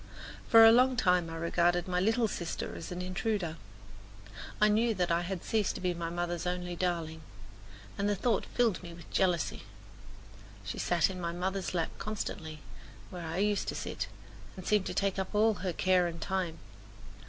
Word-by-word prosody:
For 225 Hz, -1 st, +9 dB
a 225 Hz, -, +10 dB
long 255 Hz, +2 st, +5 dB
time 180 Hz, -6 st, +2 dB
I 165 Hz, -, -6 dB
regarded 175 Hz, +1 st, +1 dB
my 180 Hz, -1 st, 0 dB
little 225 Hz, +4 st, +2 dB
sister 175 Hz, -4 st, -4 dB
as 165 Hz, -, -7 dB
an 180 Hz, 0 st, -4 dB
intruder. 185 Hz, -2 st, -2 dB, 1.0 s
I 210 Hz, -, +6 dB
knew 220 Hz, +2 st, +2 dB
that 180 Hz, -2 st, 0 dB
I 170 Hz, +1 st, +2 dB
had 175 Hz, 0 st, -4 dB
ceased 215 Hz, -3 st, 0 dB
to -, -, -5 dB
be 180 Hz, -1 st, 0 dB
my 170 Hz, -1 st, -4 dB
mother's 175 Hz, 0 st, -2 dB
only 180 Hz, 0 st, -2 dB
darling, 165 Hz, -3 st, -2 dB, 0.8 s
and 200 Hz, +1 st, +1 dB
the 205 Hz, -, +2 dB
thought 225 Hz, +2 st, 0 dB
filled 230 Hz, -7 st, +1 dB
me 170 Hz, -2 st, -9 dB
with 170 Hz, -2 st, -14 dB
jealousy. 180 Hz, -4 st, +1 dB, 1.0 s
She 95 Hz, -, -5 dB
sat 175 Hz, +1 st, +2 dB
in 185 Hz, -1 st, -6 dB
my 170 Hz, 0 st, -2 dB
mother's 185 Hz, +1 st, -2 dB
lap 165 Hz, -2 st, 0 dB
constantly, 160 Hz, -7 st, -5 dB, 0.5 s
where 175 Hz, -2 st, -6 dB
I 165 Hz, +2 st, -3 dB
used 205 Hz, +1 st, +1 dB
to -, -, -2 dB
sit, -, -, -4 dB, 0.5 s
and 185 Hz, -, -8 dB
seemed 210 Hz, -2 st, +2 dB
to -, -, -4 dB
take 195 Hz, -1 st, 0 dB
up 190 Hz, +2 st, -4 dB
all 220 Hz, +1 st, +4 dB
her 185 Hz, -1 st, -1 dB
care 180 Hz, 0 st, +3 dB
and 170 Hz, -1 st, -6 dB
time. 180 Hz, -2 st, -2 dB
180 Hz, 185 wpm, -31 LUFS, 170-205 Hz, 1.0 s, a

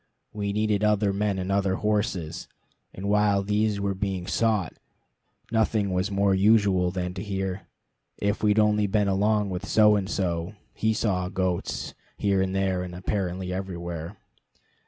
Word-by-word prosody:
We 100 Hz, -1 st, -2 dB
needed 105 Hz, 0 st, 0 dB
other 105 Hz, -1 st, +2 dB
men 100 Hz, 0 st, 0 dB
and 95 Hz, +1 st, -3 dB
other 100 Hz, -1 st, +1 dB
horses; 105 Hz, -7 st, -1 dB, 0.4 s
and 95 Hz, +2 st, -6 dB
while 100 Hz, -1 st, +3 dB
these 105 Hz, +1 st, 0 dB
were 100 Hz, 0 st, -1 dB
being 95 Hz, -2 st, -3 dB
sought, 110 Hz, -6 st, 0 dB, 0.8 s
nothing 110 Hz, -3 st, +1 dB
was 90 Hz, +2 st, 0 dB
more 100 Hz, 0 st, +2 dB
usual 100 Hz, -2 st, +4 dB
than 90 Hz, 0 st, -3 dB
to 95 Hz, -, -6 dB
hear 95 Hz, -2 st, -4 dB, 0.5 s
"if 100 Hz, +1 st, -1 dB
we'd 105 Hz, 0 st, +3 dB
only 105 Hz, -1 st, +3 dB
been 100 Hz, +1 st, +1 dB
along 105 Hz, +1 st, +1 dB
with 90 Hz, 0 st, -4 dB
So 105 Hz, -1 st, +5 dB
and 100 Hz, -2 st, -1 dB
So, 85 Hz, +1 st, -2 dB, 0.2 s
he 110 Hz, 0 st, 0 dB
saw 90 Hz, -4 st, 0 dB
goats" 90 Hz, -2 st, -2 dB, 0.2 s
here 100 Hz, -2 st, +1 dB
and 95 Hz, 0 st, -1 dB
there, 95 Hz, -1 st, 0 dB
and 90 Hz, -1 st, -6 dB
apparently 90 Hz, -1 st, -2 dB
everywhere. 85 Hz, -1 st, -5 dB
100 Hz, 155 wpm, -26 LUFS, 95-105 Hz, 0.8 s, So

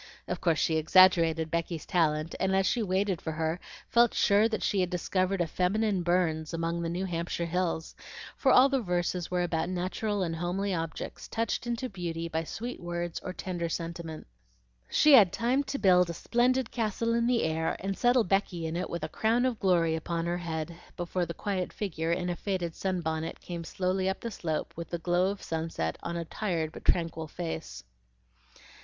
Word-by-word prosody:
Of -, -, -3 dB
course 165 Hz, -3 st, +2 dB
she 160 Hz, +1 st, +2 dB
exaggerated 165 Hz, -1 st, +5 dB
Becky's 170 Hz, -1 st, -2 dB
talent, 155 Hz, -2 st, +1 dB
and 190 Hz, 0 st, +1 dB
as 195 Hz, 0 st, +3 dB
she 235 Hz, -, +1 dB
waited 190 Hz, -2 st, 0 dB
for 160 Hz, -, -3 dB
her, 160 Hz, +2 st, -1 dB, 0.3 s
felt 235 Hz, 0 st, +4 dB
sure 205 Hz, +3 st, +4 dB
that 220 Hz, -, -2 dB
she 200 Hz, -, +1 dB
had 180 Hz, -1 st, +1 dB
discovered 185 Hz, +1 st, 0 dB
a -, -, +3 dB
feminine 195 Hz, +4 st, +1 dB
Burns 170 Hz, -2 st, 0 dB
among 165 Hz, +1 st, -1 dB
the 165 Hz, -, -2 dB
New 180 Hz, +3 st, -2 dB
Hampshire 170 Hz, -1 st, -2 dB
hills, 170 Hz, -1 st, -1 dB, 0.4 s
for 265 Hz, -, +3 dB
all 255 Hz, +2 st, +8 dB
the 275 Hz, -2 st, +1 dB
verses 175 Hz, -2 st, -1 dB
were 180 Hz, -1 st, +1 dB
about 165 Hz, -1 st, -1 dB
natural 185 Hz, +3 st, -1 dB
and 165 Hz, -2 st, -2 dB
homely 185 Hz, +4 st, -1 dB
objects, 165 Hz, -2 st, -4 dB
touched 230 Hz, +1 st, -2 dB
into 240 Hz, +2 st, -2 dB
beauty 170 Hz, -5 st, -4 dB
by 160 Hz, 0 st, -2 dB
sweet 235 Hz, +9 st, -6 dB
words 175 Hz, -1 st, -3 dB
or 185 Hz, -, -5 dB
tender 175 Hz, -2 st, -3 dB
sentiment. 165 Hz, -1 st, -5 dB, 0.6 s
She 300 Hz, -, +5 dB
had 205 Hz, -9 st, +8 dB
time 250 Hz, +4 st, +1 dB
to 280 Hz, -, -3 dB
build 180 Hz, -6 st, +5 dB
a 170 Hz, -, -4 dB
splendid 250 Hz, +3 st, +1 dB
castle 230 Hz, 0 st, 0 dB
in 235 Hz, 0 st, +2 dB
the 245 Hz, -1 st, +2 dB
air 160 Hz, 0 st, 0 dB
and 195 Hz, 0 st, -2 dB
settle 245 Hz, +1 st, +4 dB
Becky 185 Hz, -3 st, 0 dB
in 160 Hz, +1 st, -3 dB
it 180 Hz, +2 st, -2 dB
with 170 Hz, -2 st, -4 dB
a -, -, -1 dB
crown 225 Hz, +8 st, +1 dB
of 245 Hz, -4 st, -1 dB
glory 165 Hz, -4 st, +2 dB
on 170 Hz, -1 st, -2 dB
her 175 Hz, +1 st, -1 dB
head, 165 Hz, -1 st, -4 dB, 0.2 s
before 175 Hz, 0 st, -1 dB
the 170 Hz, -, -5 dB
quiet 190 Hz, -3 st, -2 dB
figure 165 Hz, -5 st, -2 dB
in 175 Hz, +1 st, 0 dB
a 175 Hz, -, -1 dB
faded 180 Hz, -3 st, -2 dB
sunbonnet 165 Hz, -4 st, -2 dB
came 170 Hz, -1 st, -6 dB
slowly 185 Hz, +2 st, -1 dB
up 190 Hz, -, -3 dB
the 230 Hz, -, -4 dB
slope 160 Hz, -6 st, -3 dB
with 170 Hz, 0 st, -6 dB
the 170 Hz, -, -2 dB
glow 175 Hz, +2 st, +2 dB
of 200 Hz, 0 st, -5 dB
sunset 160 Hz, -, -2 dB
on 170 Hz, -, -4 dB
a 170 Hz, -, -3 dB
tired 165 Hz, -4 st, -2 dB
but -, -, -11 dB
tranquil 165 Hz, -2 st, +1 dB
face. 150 Hz, -, -5 dB
175 Hz, 195 wpm, -29 LUFS, 165-195 Hz, 0.6 s, all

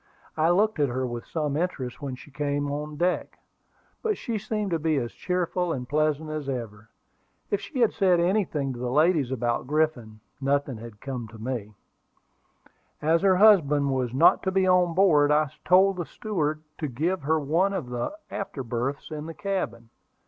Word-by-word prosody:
I 160 Hz, +1 st, +2 dB
looked 205 Hz, +1 st, +2 dB
at 145 Hz, -2 st, +3 dB
her 130 Hz, +2 st, -1 dB
with 120 Hz, -1 st, -5 dB
some 150 Hz, -3 st, -2 dB
interest 150 Hz, -6 st, -3 dB
when 135 Hz, -3 st, -4 dB
she 135 Hz, +3 st, -14 dB
came 145 Hz, 0 st, -1 dB
on 150 Hz, +1 st, -4 dB
deck; 180 Hz, +3 st, -1 dB, 0.6 s
but 435 Hz, -3 st, 0 dB
she 225 Hz, -3 st, -3 dB
seemed 210 Hz, -1 st, -3 dB
to 165 Hz, -, +1 dB
be 155 Hz, 0 st, +1 dB
as 120 Hz, -3 st, -2 dB
cheerful 180 Hz, -1 st, -1 dB
and 125 Hz, -5 st, -4 dB
pleasant 155 Hz, +2 st, 0 dB
as 150 Hz, -3 st, -4 dB
ever. 115 Hz, -4 st, -5 dB, 0.6 s
If 200 Hz, -, +1 dB
she 265 Hz, -5 st, -4 dB
had 230 Hz, -, +4 dB
said 185 Hz, -4 st, +3 dB
anything 170 Hz, -7 st, 0 dB
to 120 Hz, -, -8 dB
the 125 Hz, 0 st, -2 dB
ladies 150 Hz, 0 st, +3 dB
about 120 Hz, -1 st, -1 dB
Griffin, 140 Hz, -8 st, -1 dB, 0.2 s
nothing 140 Hz, -2 st, 0 dB
had 110 Hz, -2 st, -11 dB
come 125 Hz, -4 st, -5 dB
to 110 Hz, +1 st, -13 dB
me. 110 Hz, -2 st, -5 dB, 1.2 s
As 160 Hz, +2 st, +2 dB
her 190 Hz, -1 st, +4 dB
husband 150 Hz, -9 st, +5 dB
was 130 Hz, -3 st, -1 dB
not 135 Hz, +7 st, +5 dB
to 190 Hz, -, -1 dB
be 190 Hz, 0 st, +2 dB
on 180 Hz, -2 st, +3 dB
board, 155 Hz, -7 st, +5 dB
I 150 Hz, -1 st, +2 dB
told 190 Hz, +1 st, +5 dB
the 175 Hz, -, -3 dB
steward 155 Hz, -8 st, -2 dB, 0.2 s
to 155 Hz, -, -1 dB
give 160 Hz, +8 st, -1 dB
her 155 Hz, +3 st, +1 dB
one 165 Hz, +7 st, +1 dB
of 165 Hz, -11 st, -4 dB
the 120 Hz, -, -3 dB
after 150 Hz, -8 st, -4 dB
berths 125 Hz, +6 st, -3 dB
in 155 Hz, 0 st, -5 dB
the 165 Hz, -, -7 dB
cabin. 185 Hz, -, -3 dB
150 Hz, 185 wpm, -26 LUFS, 130-180 Hz, 1.2 s, husband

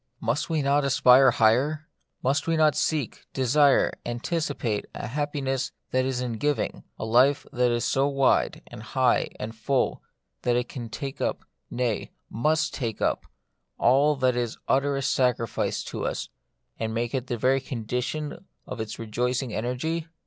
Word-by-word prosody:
Must 120 Hz, +9 st, -1 dB
we 160 Hz, -3 st, 0 dB
not 140 Hz, +1 st, +3 dB
aspire 130 Hz, -1 st, +6 dB
higher? 130 Hz, +8 st, +2 dB, 0.4 s
Must 135 Hz, +5 st, +1 dB
we 165 Hz, 0 st, +2 dB
not 155 Hz, -1 st, +5 dB
seek, 150 Hz, -7 st, -1 dB
desire, 140 Hz, +2 st, +3 dB
anticipate 120 Hz, -, -2 dB
a -, -, -5 dB
happiness 135 Hz, 0 st, -2 dB, 0.2 s
that 130 Hz, 0 st, +2 dB
is 130 Hz, -1 st, -1 dB
in 120 Hz, -3 st, -3 dB
giving; 145 Hz, -1 st, -1 dB
a -, -, -4 dB
life 130 Hz, +6 st, +4 dB
that 125 Hz, -1 st, +2 dB
is 120 Hz, +1 st, 0 dB
so 135 Hz, +1 st, +2 dB
wide, 135 Hz, -2 st, +2 dB
and -, -, -10 dB
high, -, -, +2 dB
and 115 Hz, +2 st, -5 dB
full, 130 Hz, +4 st, 0 dB, 0.4 s
that 120 Hz, -, +1 dB
it 120 Hz, 0 st, 0 dB
can 120 Hz, -3 st, -7 dB
take 135 Hz, +4 st, -6 dB
up, -, -, -2 dB, 0.2 s
nay, 120 Hz, -4 st, -1 dB, 0.2 s
must 155 Hz, +6 st, +1 dB
take 115 Hz, -5 st, -3 dB
up, -, -, 0 dB, 0.5 s
all 140 Hz, +5 st, +4 dB
that 130 Hz, -2 st, +2 dB
is 120 Hz, -1 st, -2 dB
utterest 135 Hz, 0 st, +1 dB
sacrifice 125 Hz, -4 st, 0 dB
to -, -, -4 dB
us, -, -, -4 dB, 0.5 s
and 110 Hz, 0 st, -2 dB
make 120 Hz, +2 st, -1 dB
it 130 Hz, -1 st, -2 dB
the 120 Hz, -3 st, -2 dB
very 130 Hz, +4 st, +2 dB
condition 125 Hz, -, -4 dB, 0.2 s
of -, -, -5 dB
its 110 Hz, 0 st, -5 dB
rejoicing 120 Hz, +2 st, -2 dB
energy 155 Hz, +8 st, -2 dB
130 Hz, 155 wpm, -26 LUFS, 120-145 Hz, 0.5 s, aspire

